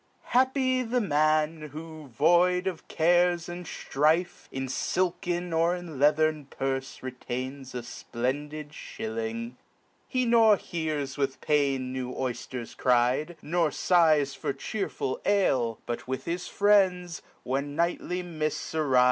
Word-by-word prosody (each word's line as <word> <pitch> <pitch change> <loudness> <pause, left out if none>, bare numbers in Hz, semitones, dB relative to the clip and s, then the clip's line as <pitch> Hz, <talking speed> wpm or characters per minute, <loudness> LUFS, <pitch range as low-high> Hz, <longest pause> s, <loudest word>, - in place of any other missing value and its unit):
HAPPY 260 0 +3
the 250 +1 0
man, 155 -3 +1
who, 155 -1 -8
void 175 +7 +3
of 185 -4 -4
cares 175 +1 +3
and 175 -1 -7
ftrife. 155 +6 0
In 135 0 -3
filken, 175 +4 -1
or 165 +2 +3
in 170 -6 -8
leathern, 150 0 +3
purfe 135 -1 -3
retains 130 +1 -5
A 120 - -3
SPLENDIDSHILLING: 120 -3 -4 0.5
he 255 -2 0
norhears 165 - +2
with 135 -1 -1
pain 135 -3 +1
New 130 -1 -3
oyfters 125 -1 -4
cry'd, 125 +7 +2
nor 165 +1 +1
fighs 155 -3 +3
for - - -3
chearful 140 -2 -3
ale; 135 - +2
But 120 +1 -4
with 130 0 -3
his 175 +1 -3
friends, 185 -4 +2 0.2
when 140 +3 -2
nightly 175 +2 -1
mifts 155 -4 -3
arife 145 -5 +3
155 Hz, 120 wpm, -28 LUFS, 135-175 Hz, 0.5 s, HAPPY